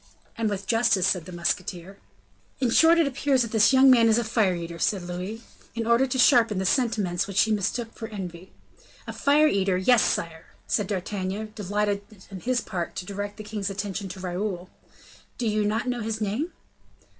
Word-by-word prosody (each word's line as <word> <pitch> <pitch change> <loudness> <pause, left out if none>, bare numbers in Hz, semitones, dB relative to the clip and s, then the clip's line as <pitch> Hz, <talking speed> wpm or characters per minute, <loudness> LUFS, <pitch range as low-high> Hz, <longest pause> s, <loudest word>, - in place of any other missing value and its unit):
"And 225 -1 -1
with 200 -1 -4
justice," 225 -4 +2
said 180 -4 0
the 185 - -9
musketeer. 175 +2 -3 0.6
"In 250 -3 +1
short, 325 +6 +6
it 335 - +4
appears 275 -1 +1
that 230 - -6
this 220 +1 +4
young 265 0 +7
man 230 -2 +5
is 220 - +4
a 240 - +1
fire 215 -5 +1
eater," 170 0 -7
said 195 0 0
Louis, 180 +6 -6 0.3
in 230 -1 -2
order 235 +3 +3
to 260 - -2
sharpen 235 -5 +4
the 190 - -1
sentiment 200 -5 0
which 200 0 +2
he 220 - +2
mistook 220 +3 -2
for 225 - -7
envy. 185 -4 -8 0.5
"A - - -6
fire 290 +2 +3
eater! 195 -7 +1
Yes, 225 +5 +4
sire," 160 0 -2 0.2
repeated 205 -4 0
D'Artagnan, 200 +2 -4
delighted 205 0 -1 0.3
on 190 - -7
his 250 +4 0
part 175 -4 -5
to 180 - -5
direct 205 +1 -5
the 215 - -7
king's 210 -2 -4
attention 195 0 -4
to 185 +1 -8
Raoul. 185 0 -4 0.7
"Do 245 - -3
you 210 -1 +1
not 220 +4 -1
know 245 -1 -2
his 220 0 -3
name?" 220 - -2
210 Hz, 190 wpm, -25 LUFS, 185-230 Hz, 0.7 s, young